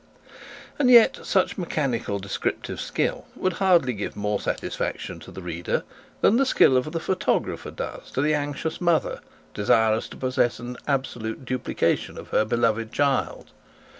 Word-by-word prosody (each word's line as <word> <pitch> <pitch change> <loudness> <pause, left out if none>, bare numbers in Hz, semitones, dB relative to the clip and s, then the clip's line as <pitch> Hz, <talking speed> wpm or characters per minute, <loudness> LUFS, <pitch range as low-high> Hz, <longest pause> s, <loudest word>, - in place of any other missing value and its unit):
And 265 -3 +4
yet 235 -2 +7
such 190 0 +1
mechanical 135 - -1
descriptive 100 0 -3
skill - - -2
would 185 - 0
hardly 175 -9 +4
give 105 -2 -5
more 105 0 -1
satisfaction - - -3
to - - -12
the 95 - -9
reader 85 0 -2 0.4
than 225 - +5
the 275 - +3
skill 135 - +5
of 130 +4 +1
the 165 - -2
photographer 185 +3 -1
does - - -7
to 130 - 0
the 155 +1 +2
anxious 145 +3 -2
mother 170 -2 +1 0.3
desirous 110 +1 +2
to - - -10
possess 130 -2 +1
an 125 +1 -7
absolute 130 -4 -2
duplicate 130 0 0
of - - -9
her 110 - +2
beloved 115 0 0
child. 140 -2 0
130 Hz, 150 wpm, -25 LUFS, 110-160 Hz, 0.4 s, yet